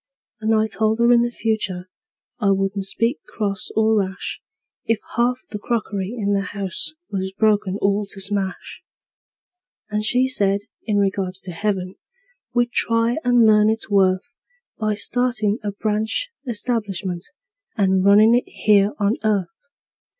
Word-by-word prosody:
And 220 0 +1
I 215 0 +3
told 220 0 0
her 235 +1 +4
in 235 - +5
the 240 - +1
future 215 -6 -2 0.5
I 205 -4 +2
wouldn't 195 0 0
speak 230 +7 0
cross 200 -3 -3
or 220 0 +3
rash 190 -1 -4 0.4
If 225 - +2 0.2
half 245 +1 +1
the 210 - -4
crockery 210 -2 -2
in 205 -2 0
the 200 - +1 0.2
house 200 - -3 0.2
was 190 -1 -2
broken 205 -2 +1
all 200 +1 +1
to 195 - -7
smash; 195 -1 -2 1.1
And 210 0 -1
she 250 +4 +2
said, 200 -6 +2 0.3
in 210 -2 +1
regards 195 -2 0
to 185 - -7
heaven, 185 0 -2 0.5
we'd 240 0 +1
try 230 +1 +2
and 245 -2 +4
learn 210 0 +5
its 220 -1 -2
worth 190 +6 +2 0.4
By 215 -1 0
startin' 240 -1 0
a 205 - -2
branch 215 - -1 0.2
establishment 205 -6 -2 0.5
and 190 -2 +2
runnin' 210 +3 +6
it 245 - +1
here 205 -1 +3
on 205 +1 +1
earth. 215 - -1
210 Hz, 145 wpm, -21 LUFS, 195-230 Hz, 1.1 s, runnin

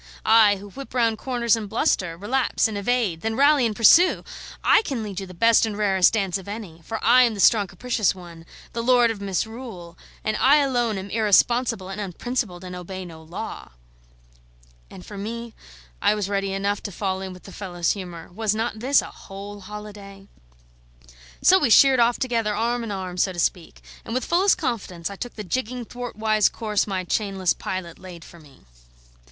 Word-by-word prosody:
I, 220 -2 +6
who 200 +1 -11
whip 275 +2 -10
round 230 -3 +1
corners 240 -4 +1
and 215 -3 -6
bluster, 190 - 0
relapse 240 +6 0
and 220 - -6
evade, 200 -5 0
then 225 0 -2
rally 280 -1 +4
and 215 - -4
pursue! 335 - +5 0.4
I - - +5
can 265 - -4
lead 200 -2 -5
you 195 - -7
the 185 - -12
best 230 +5 +4
and 215 -2 -2
rarest 195 -3 +3
dance 195 -3 0
of 190 - -13
any; 200 -6 -8
for 225 +7 -4
I 245 +3 +7
am 235 -3 +3
the - - -8
strong 205 0 +4
capricious 215 +1 -1
one, 170 -2 -12 0.3
the 235 - -2
lord 240 -1 +4
of 210 -3 -7
misrule, 200 -2 -5 0.3
and 215 - -1
I 275 +3 +5
alone 245 -7 +1
am 195 +1 -7
irresponsible 225 -1 +2
and 195 +2 -5
unprincipled, 200 -1 -4
and 180 0 -7
obey 185 +1 -7
no 165 -2 -11
law." 170 - -8 1.2
And 180 - -12
for 205 -2 -9
me, 230 +2 -6 0.5
I 210 - +3
was 205 -2 -2
ready 195 -1 -1
enough 200 +1 -1
to 200 - -6
fall 190 0 -3
in 190 -1 -6
with 180 0 -12
the 195 - -12
fellow's 175 -3 -2
humour; 175 -5 -7
was 215 +1 0
not 220 0 -2
this 265 +4 +3
a - - -9
whole 200 +1 -10
holiday? 200 -1 -10 1.2
So 375 +2 +6
we 245 - +1
sheered 265 +3 +6
off 235 0 +3
together, 230 -5 -1
arm 235 +2 -1
in 230 - -5
arm, 185 -2 -5
so 185 +1 +1
to 175 - -6
speak; 170 0 -2 0.2
and 230 - -5
with 255 - -1
fullest 370 +3 +3
confidence 200 - -3
I - - -7
took 245 +5 -7
the 210 - -6
jigging, 245 +4 -3
thwartwise 220 -3 0
course 215 -3 -1
my 190 -2 -2
chainless 190 -1 0
pilot 185 -3 -6
laid 180 -3 -11
for 170 - -14
me. 145 -4 -19
210 Hz, 190 wpm, -23 LUFS, 190-235 Hz, 1.2 s, I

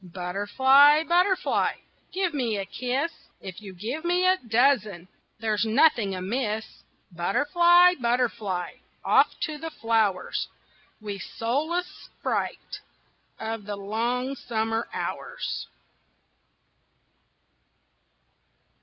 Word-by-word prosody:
Butterfly, 205 - +4
butterfly, 360 +3 +2 0.4
Give 365 -2 -1
me 240 -7 -1
a 195 - -3
kiss; 255 +10 -2 0.3
If 190 +1 -9
you 200 -2 -9
give 225 - -5
me 355 +1 +1
a 370 0 +4
dozen 225 - +1 0.3
There's 215 -1 0
nothing 220 -3 +3
amiss. 215 +3 -2 0.5
Butterfly, 345 - +4
butterfly, 235 -7 -1 0.3
Off - - +3
to 310 -3 -3
the 325 +1 -5
flowers, 225 -8 0 0.5
Wee, 205 -2 -6
soulless 295 - -2
sprite - - -5 0.6
Of 220 -1 -5
the 205 0 -4
long 235 +6 -2
summer 225 -2 -2
hours. - - -4
235 Hz, 90 wpm, -26 LUFS, 205-300 Hz, 0.6 s, Butterfly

